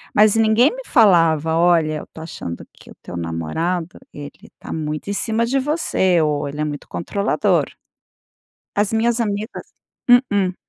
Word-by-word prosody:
Mas 210 -1 +5
ninguém 225 - +4
me - - -7
falava: 165 -7 +3
"Olha, 165 -3 +3
eu - - -7
estou 160 - -11
achando 85 - -7
que - - -19
o - - -13
teu 90 - -7
namorado, 120 - -3
ele 145 0 -11
tá - - -10
muito 155 +3 -4
em - - -1
cima 225 +3 0
de 270 +3 0
você." 260 - +1
ou 150 -1 0
"Ele 150 +2 -5
é - - +1
muito 145 -1 -5
controlador". 200 +4 0 1.1
As 205 +1 +1
minhas 230 +1 +1
amigas 210 +2 -4 0.4
Mm-mm. 205 -7 +3
180 Hz, 155 wpm, -20 LUFS, 155-220 Hz, 1.1 s, Mas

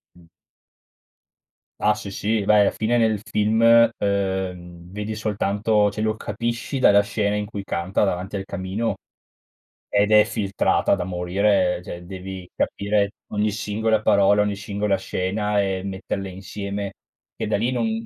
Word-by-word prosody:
Mh. 90 -1 -19 1.5
Ah, 105 0 +3
sì, 100 -2 -7
sì. 105 +2 -1
Beh, 105 0 +5
alla 100 - +5
fine 115 +2 0
nel 110 -2 +2
film, 110 +2 0 0.4
uhm, 95 -3 -3
vedi 105 +2 -4
soltanto 105 0 +1
cioè 105 - -5
lo 110 0 0
capisci 115 +6 -3
dalla 100 -5 +6
scena 100 0 -1
in 105 - -1
cui 100 -2 -6
canta 95 +3 -1
davanti 95 +1 -2
al 95 - -3
camino, 100 +4 -3 0.9
ed 105 +1 +2
è 105 0 +7
filtrata 100 -2 +1
da 95 - -3
morire, 90 +1 +1
cioè 90 -1 -8
devi 95 -1 -8
capire 100 0 0 0.2
ogni 105 0 +1
singola 110 +1 0
parola, 100 0 +4
ogni 105 0 0
singola 100 0 -1
scena, 100 +2 -1
e 95 -1 -1
metterle 95 0 -4
insieme 100 +1 -5 0.4
che - - -4
da - - +1
lì 120 +5 0
non 225 - -1
100 Hz, 145 wpm, -23 LUFS, 95-105 Hz, 1.5 s, è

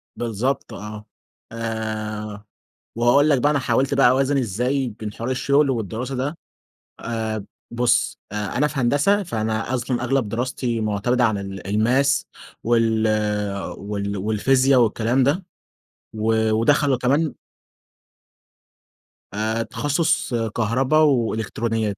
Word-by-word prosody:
بالضبط 120 +3 -2
آه. 105 +1 -8 0.5
آآ 110 -2 -4 0.5
وهاقول 120 +6 +4
لك 140 -3 +4
بقى 145 +4 +3
أنا 145 - +1
حاولت 135 +1 +1
بقى 135 -2 +5
أوازن 135 +2 +2
إزاي 125 +4 0
بين 105 -1 -5
حوار 115 +2 -4
الشغل 140 +3 +2
والدراسة 120 +2 -3
ده. 135 +5 -2 0.6
آآ 110 -3 -3 0.3
بُص، 120 +3 +1
أ - - -6 0.2
أنا 150 +3 +3
في 145 -1 -4
هندسة، 145 +12 +2
فأنا 110 - -2
أصلًا 125 0 -2
أغلب 125 -3 0
دراستي 120 0 -2
مُعتمدة 110 +4 +1
عن 110 -3 +2
ال 95 0 -6
الmaths 125 +7 +2 0.4
وال 115 -1 +2 0.7
وال 100 0 -4
والفيزيا 130 +7 +3
والكلام 120 +2 +2
ده. 150 +8 +1 0.7
و 110 0 +1
ودخّلوا 135 +5 +3
كمان 140 +5 +1 2.0
آآ، 110 +2 -1
تخصُّص 145 +2 0 0.2
كهربا 125 +6 +1
وإلكترونيات. 115 -5 0
120 Hz, 115 wpm, -22 LUFS, 110-135 Hz, 2.0 s, بقى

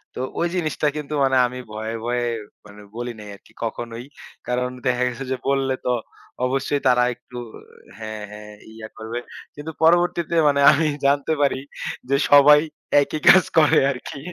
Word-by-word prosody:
তো - - -6 0.2
ওই 170 - +1
জিনিসটা 155 -3 -1
কিন্তু 150 0 -5
মানে 135 -1 +2
আমি 125 +1 -8
ভয়ে 110 +1 -5
ভয়ে 120 0 -1 0.4
মানে 105 0 -14
বলি 120 +1 -4
নাই, 105 -1 -10
আরকি - - -22
কখনোই। 115 +1 -5 0.4
কারণ 125 +1 -1 0.2
দেখা 125 0 +1
গেছে 125 +2 -5
যে 130 - -1
বললে 135 -1 +1
তো 125 - +1 0.5
অবশ্যই 135 +2 -1
তারা 125 -1 +4
একটু 125 - -13 0.6
হ্যাঁ, 110 -1 -7
হ্যাঁ 105 0 -11 0.2
ইয়া 110 -1 -9
করবে। 110 +2 -5 0.4
কিন্তু 150 +2 -7
পরবর্তীতে 170 0 +2
মানে 140 -1 +2
আমি 155 +2 +1 0.2
জানতে 140 +2 +2
পারি, 140 -2 +1 0.5
যে 140 - +3 0.2
সবাই 145 +1 +8 0.4
একই 155 +2 -3
কাজ 185 - +8
করে 155 -2 +5
আরকি 135 +1 -8
130 Hz, 160 wpm, -22 LUFS, 120-145 Hz, 0.6 s, সবাই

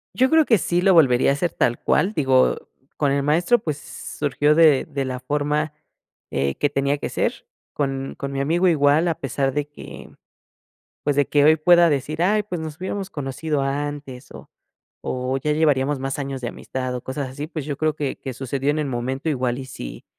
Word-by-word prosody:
Yo 260 +1 +3
creo 320 +1 +5
que 225 - +4
sí 175 0 0
lo 190 +1 +4
volvería 135 -8 +5
a - - +4
hacer 170 +5 -1
tal 120 - +1
cual, 200 +4 +1
digo, 130 -6 +3 0.4
con 140 -2 +1
el 140 0 0
maestro, 170 +10 +3
pues, 155 -7 -3
surgió 145 0 -1
de 155 -4 +5
de 140 -1 -3
la 130 -1 -4
forma, 150 +2 -1 0.6
eh, 70 0 -1
que 145 - +1
tenía 140 0 0
que - - -4
ser, - - -2 0.3
con 135 -2 -3
con 140 0 -4
mi 135 - -1
amigo 170 +6 +2
igual, 155 0 +3
a 165 - 0
pesar 135 0 -1
de 145 +1 -2
que, 145 - -11 1.0
pues, 145 - +1
de 145 -1 +3
que 145 -1 +3
hoy 155 +1 +6
pueda 170 +2 +5
decir: 155 +3 -1
"Ay, 210 +3 +3
pues, 180 -5 -5
nos 155 0 -6
hubiéramos 190 +1 -4
conocido 145 +1 -3
antes 140 -2 -4
o - - -12 0.5
o 130 +1 -2
ya 150 +3 0
llevaríamos 145 -2 +2
más 135 +1 -3
años 135 -1 -4
de 120 - -3
amistad", 130 -1 -5
o 125 - -5
cosas 130 0 -4
así, 145 +4 -6
pues, 155 -3 -6
yo 145 -1 -3
creo 155 -1 0
que 145 -3 -3
que 130 - -6
sucedió 135 +2 -2
en 150 - +1
el 150 - -1
momento, 130 +4 -3
igual 125 -4 -1
y 130 - -6
si 90 - -9
145 Hz, 205 wpm, -22 LUFS, 135-155 Hz, 1.0 s, hoy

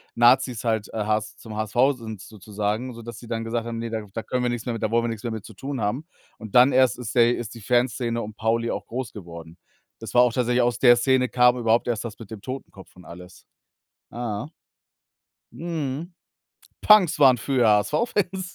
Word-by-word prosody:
Nazis 120 0 +3
halt, 110 -2 -1
äh, 110 -2 -2
HS 105 0 -1
zum 110 -2 -10
HSV 120 +6 +1
sind 110 -4 -8
sozusagen, 105 +4 -4
sodass 115 0 -9
sie 120 - -12
dann 115 -1 -3
gesagt 115 0 -2
haben: 115 -1 -5
„Ne, 115 0 -4
da 110 -1 -3
da 115 - -3
können 125 +4 -2
wir 125 - +1
nix 120 -2 -4
mehr 120 - -2
mit 115 -1 -5
da 110 - 0
wollen 115 0 +2
wir - - 0
nix 115 0 -5
mehr 120 - -3
mit 110 -3 -6
zu 110 - -11
tun 135 +6 -5
haben.“ 120 +9 -2 0.3
Und 110 -3 -10
dann 125 +2 +7
erst 130 -1 +3
ist 115 -3 -6
der 120 0 +5
ist 115 -1 -7
die 115 - -11
Fanszene 120 +1 0
um 105 -1 -7
Pauli 115 +1 0
auch - - -4
groß 125 -1 -5
geworden. 85 -3 -10 0.4
Das 115 -2 -8
war 125 - +6
auch 120 -2 +1
tatsächlich 125 0 +1
aus 120 -2 +1
der 120 -2 +6
Szene 125 0 +2
kam 125 0 +4
überhaupt 115 0 +1
erst 115 -2 -1
das 115 -1 -8
mit 115 - -11
dem 110 -3 -8
Totenkopf 130 -7 -9
und 90 - -15
alles. 90 +1 -13 0.7
Aha. 120 +3 -5 1.0
Mhm. 165 0 -4 0.7
Punks 210 -8 +5
waren 130 -4 +6
früher 125 -2 +1
HSV 105 -1 +3 0.2
Fans. 185 -2 -2
115 Hz, 215 wpm, -24 LUFS, 110-125 Hz, 1.0 s, dann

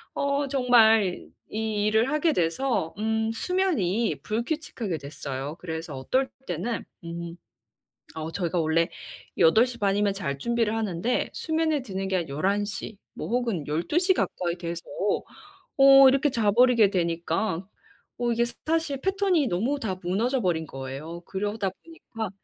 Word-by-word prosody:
어 280 0 0
정말 225 -7 +4 0.2
이 215 -1 -1
일을 220 +5 +2
하게 305 +1 +2
돼서 175 - 0
음 220 +1 0
수면이 235 - 0
불규칙하게 235 - -3
됐어요. 140 0 -6
그래서 160 -3 -5
어떨 260 - 0 0.2
때는 185 +6 -3 0.2
음 170 0 -6 0.8
어 160 +1 -4
저희가 175 -2 -1
원래 165 +1 +2 0.5
8 220 +9 +6
시 245 -1 -8
반이면 200 0 +2
잘 140 -8 -3
준비를 230 +2 0
하는데 215 +1 -1
수면에 315 -3 0
드는 195 -4 -4
게 190 - +1
한 170 -4 -3
11 195 +9 0
시 205 +1 -6 0.2
뭐 - - -5
혹은 230 - -1
12 165 - -1
시 375 +1 +3
가까이 175 - -1
돼서 170 -1 -5 0.9
어 270 0 +9
이렇게 275 +2 +2
자버리게 230 0 +4
되니까 170 +1 -1 0.5
어 240 0 0
이게 235 +1 +2
스타시 310 +5 -2
패턴이 385 -6 +2
너무 235 +10 0
다 190 -7 -3
무너져 230 +9 0
버린 170 -5 0
거예요. 135 +6 -7
그러다 205 0 -2
보니까 225 - -7
215 Hz, 270 characters per minute, -26 LUFS, 170-250 Hz, 0.9 s, 어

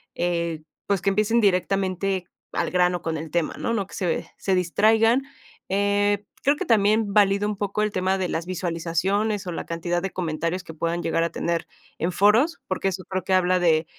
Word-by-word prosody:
eh, 170 -2 -1 0.3
pues, 200 -2 +1
que 195 - +2
empiecen 215 +4 +2
directamente 190 -1 +1 0.3
al - - -1
grano 180 -1 +2
con 160 -1 -2
el 160 +1 -6
tema, 170 0 0
¿no? - - -1
No 205 -4 -1
que - - -17
se 180 -3 -2
se 190 -1 0
distraigan. 220 +7 +3 0.5
Eh, 205 +1 +1 0.2
creo 285 +2 +4
que 380 - -3
también 215 -2 +3
valido 200 0 +4
un 210 - -2
poco 205 +1 -1
el 215 - 0
tema 190 0 0
de 185 -2 -2
las 165 +1 -3
visualizaciones 185 +4 -1
o 180 - -4
la 165 - -5
cantidad 170 +1 -2
de 195 - -2
comentarios 170 +1 -2
que 160 - -10
puedan 170 +2 -2
llegar 165 - 0
a 170 - 0
tener 170 0 -2 0.3
en 170 +3 0
foros, 215 - +3
porque 190 +1 -1
eso 185 0 -2
creo 190 -1 -2
que 190 - -1
habla 185 0 +3
de, 160 -2 +3
185 Hz, 195 wpm, -24 LUFS, 170-205 Hz, 0.5 s, creo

